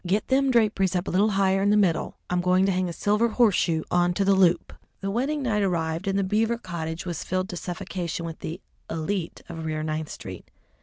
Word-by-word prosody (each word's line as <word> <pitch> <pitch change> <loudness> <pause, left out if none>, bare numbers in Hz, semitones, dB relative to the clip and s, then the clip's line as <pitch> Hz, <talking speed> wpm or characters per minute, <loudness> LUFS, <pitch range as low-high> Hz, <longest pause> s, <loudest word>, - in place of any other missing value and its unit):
Get 195 +4 0
them 270 +1 +3
draperies 210 -6 +2
up 180 +1 -1
a - - -2
little 200 +4 +3
higher 195 0 +3
in 200 - +3
the 210 - +4
middle; 185 -6 +1
I'm 180 0 0
going 180 +1 +3
to 195 - +2
hang 185 -1 0
a - - -3
silver 210 +6 +2
horseshoe 200 -9 +2
on 175 0 +2
to 195 - +1
the 195 - +5
loop." 180 -3 +3 0.3
The 195 0 -3
wedding 275 +6 -1
night 215 -5 +1
arrived, 170 -1 -1
and 195 0 +1
the 200 - +2
Beaver 220 +4 +1
cottage 170 -5 -5
was 175 -3 -4
filled 185 +1 -2
to 180 - -5
suffocation 175 -1 -4
with 165 -1 -6
the 170 +4 -6 0.3
élite 165 +2 -3
of 165 -1 -6
Rear 155 -1 -2
Ninth 155 0 -3
Street. - - -9
185 Hz, 220 wpm, -25 LUFS, 170-205 Hz, 0.3 s, the